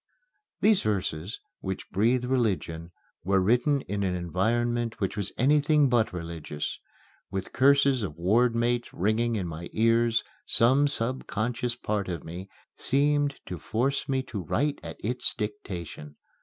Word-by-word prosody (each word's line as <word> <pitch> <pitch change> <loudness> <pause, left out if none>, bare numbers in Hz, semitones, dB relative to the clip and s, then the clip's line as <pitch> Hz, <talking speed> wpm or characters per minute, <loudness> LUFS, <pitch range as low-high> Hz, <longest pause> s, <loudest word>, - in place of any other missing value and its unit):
These 210 -1 +5
verses, 95 -2 -2 0.2
which 95 -1 -5
breathe 120 +5 +2
religion, 100 -10 -1 0.3
were 95 +1 +3
written 125 +8 +3
in 100 -4 -3
an 95 -2 0
environment 115 +7 0
which 95 - -1
was 100 -3 -2
anything 145 +2 +4
but 120 -3 +2
religious. 85 -4 -5 0.5
With 95 +1 -4
curses 140 -1 +4
of 80 -7 -4
ward 115 +7 +3
mates 120 +1 0
ringing 110 +5 +1
in 100 -4 -1
my 85 +1 -6
ears, 115 0 +3 0.2
some 130 +5 +4
subconscious 120 -2 -1
part 105 -5 -2
of 85 -4 -4
me 90 +4 -8 0.3
seemed 145 +1 +2
to 90 - -6
force 130 +7 -1
me 135 -1 +1
to 110 -6 -5
write 140 - 0
at - - -8
its 125 +3 -1
dictation. 90 -8 -6
115 Hz, 140 wpm, -27 LUFS, 95-125 Hz, 0.5 s, These